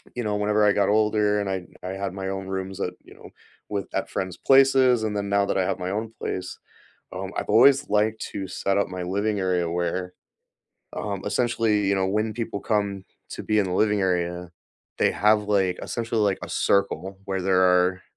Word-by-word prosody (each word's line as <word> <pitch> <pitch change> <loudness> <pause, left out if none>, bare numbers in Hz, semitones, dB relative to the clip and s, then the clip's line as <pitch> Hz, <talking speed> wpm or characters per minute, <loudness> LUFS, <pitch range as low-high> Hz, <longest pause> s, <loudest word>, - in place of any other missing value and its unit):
you 120 - -3
know, 105 -1 -1
whenever 105 +1 +2
I 105 - +5
got 100 -1 +2
older 105 -1 +2
and 100 - -3
I 95 -2 -3 0.2
I 90 - -3
had 100 -1 -3
my 95 0 -4
own 95 0 -4
rooms 95 0 -4
at 90 - -2
you - - -16
know, - - -13 0.4
with 100 -1 -3
at - - -2
friends' 95 -1 -4
places, 135 -2 +4
and 105 -1 -2
then 100 0 -2
now 100 0 +2
that - - -1
I 95 - +2
have - - -1
my 90 - -3
own 110 +2 -3
place, 90 -1 -4 0.6
um, 95 +1 -5
I've - - -3
always 135 +6 +5
liked 105 +1 +1
to 95 -1 -5
set 95 +1 -1
up 100 - +1
my 90 0 -5
living 100 +3 -1
area 90 -3 0
where, 90 +1 -2 0.8
um, 100 -2 -4
essentially, 115 -2 +1
you 100 - +2
know, 95 -1 +1
when 105 +3 0
people 115 -2 -4
come 100 -3 -1 0.3
to - - -6
be 110 0 +1
in 105 - +3
the 90 - -3
living 105 +1 +2
area, 90 -1 -1 0.5
they - - +3
have, 105 0 +3
like, 95 -3 +1
essentially, 115 -1 -2
like, 100 -2 +1
a - - -10
circle 95 -1 0
where 95 -1 -2
there 95 0 +3
are, 90 0 +3
100 Hz, 210 wpm, -24 LUFS, 95-105 Hz, 0.8 s, I